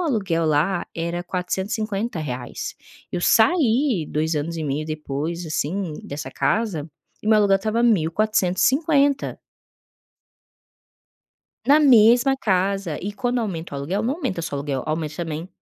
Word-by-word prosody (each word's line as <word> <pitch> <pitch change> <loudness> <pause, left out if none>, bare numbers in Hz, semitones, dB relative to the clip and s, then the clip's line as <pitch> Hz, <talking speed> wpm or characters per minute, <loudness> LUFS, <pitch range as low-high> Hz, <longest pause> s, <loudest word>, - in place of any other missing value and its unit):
aluguel 195 - 0
lá 165 +5 +1
era 170 +1 -3
R$450,00. 185 - -3 0.4
Eu - - -1
saí 230 - +3
2 160 +2 -1
anos 160 +3 -2
e 160 - -3
meio 145 +2 -2
depois, 155 +2 -4
assim, 160 +3 -2
dessa 145 +1 -6
casa, 195 -9 -1 0.3
e - - -8
meu 220 - +6
aluguel 200 -2 +4
estava 215 +4 -1
R$1.450,00. 225 - +2 2.3
Na 290 +2 +6
mesma 245 0 +6
casa. 195 - 0
E 200 - -3
quando 245 +3 -1
aumenta 170 -8 -4
o - - -3
aluguel, 180 +10 -2
não 250 +5 0
aumenta 245 - -3
só 160 - -4
aluguel, 140 -2 -3
aumenta 155 -1 -3
também 165 0 -4
185 Hz, 125 wpm, -22 LUFS, 155-225 Hz, 2.3 s, meu